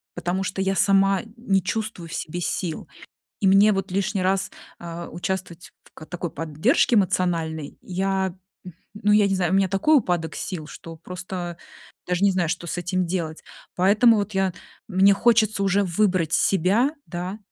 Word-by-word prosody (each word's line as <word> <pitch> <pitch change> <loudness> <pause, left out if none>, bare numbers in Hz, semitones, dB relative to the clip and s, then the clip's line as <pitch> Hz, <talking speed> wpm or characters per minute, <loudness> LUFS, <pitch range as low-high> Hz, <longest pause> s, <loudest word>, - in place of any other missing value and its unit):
потому 175 +2 -2
что 195 0 -3
я 195 0 0
сама 195 -1 +3 0.2
не 195 -6 0
чувствую 215 -6 -4
в - - -8
себе 175 +3 -4
сил. 170 -1 -3 0.5
И 195 - +1
мне 200 +3 +6
вот 195 -1 -3
лишний 195 0 -1
раз, 190 +1 +1 0.3
а, 170 0 -7
участвовать 180 -1 -5
в - - -22
ка 155 - -11
такой 175 -2 -5
поддержке 165 - +1
эмоциональной, 165 -6 0
я, 190 0 -1 0.6
ну 210 0 +1
я 210 -1 +5
не 195 - 0
знаю, 185 -1 0
у - - +4
меня 195 -1 +2
такой 200 - +3
упадок 175 -9 -1
сил, 170 -6 -5
что 165 -1 -10
просто 180 0 -6 0.5
даже 180 +2 0
не 200 - +4
знаю, 180 -3 0
что 170 - -3
с 165 - -3
этим 180 +1 -1
делать. 165 -3 -3 0.3
Поэтому 210 +5 +5
вот 205 +1 -2
я 190 -1 0 0.3
мне 195 0 +5
хочется 220 -1 +2
уже 195 +1 +2
выбрать 180 -3 +1
себя, 200 - +2 0.2
да. 180 +3 -5
190 Hz, 170 wpm, -23 LUFS, 175-195 Hz, 0.6 s, мне